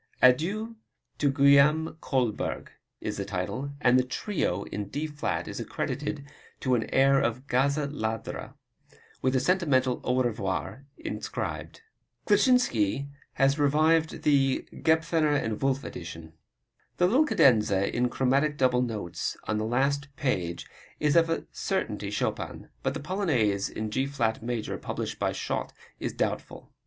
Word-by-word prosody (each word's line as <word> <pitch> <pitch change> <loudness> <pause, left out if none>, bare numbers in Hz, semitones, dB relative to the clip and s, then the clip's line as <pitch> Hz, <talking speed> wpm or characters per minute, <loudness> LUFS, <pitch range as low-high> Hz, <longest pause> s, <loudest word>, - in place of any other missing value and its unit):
Adieu 195 - +3 0.4
to 145 - +3
Guillaume 140 +3 +5
Kolberg, 125 -6 -1 0.3
is - - -3
the 100 - -2
title, 100 +9 -3
and 125 -2 +5
the - - +2
Trio 125 - -2
in 105 0 -5
D 145 +6 -3
flat 150 -1 -3
is - - -5
accredited 145 -1 -3 0.4
to 130 - +1
an 115 -3 0
air 135 +1 +4
of 120 +3 -1
"Gazza 140 +3 +1
Ladra," 110 -6 -4 0.7
with 130 0 +1
a - - +4
sentimental 130 -6 +2
Au 130 +1 +2
Revoir 120 +4 -3
inscribed. - - -5 0.4
Kleczynski 195 - +3 0.2
has 135 +1 +2
revised 155 +3 +2
the 135 -3 +2
Gebethner 160 -2 +2 0.2
& - - -20
Wolff 135 0 +1
edition. 85 -2 -8 0.6
The 180 - +4
little 250 +12 +4
cadenza 105 - +3
in 125 +1 +2
chromatic 140 +4 +1
double 125 -2 +3
notes 110 -8 -3
on 110 0 -1
the 110 - -1
last 140 +5 +1
page 90 -11 -2 0.3
is 150 0 +2
of 165 -1 +5
a 165 - -1
certainty - - -2
Chopin. - - -3
But - - -1
the - - -3
Polonaise 140 - 0
in 110 -1 -4
G 130 +5 0
flat 115 -6 -1
major, 115 -1 -3
published - - -4
by - - +1
Schott, - - -3 0.3
is - - -2
doubtful. - - -4
135 Hz, 140 wpm, -28 LUFS, 120-150 Hz, 0.7 s, Guillaume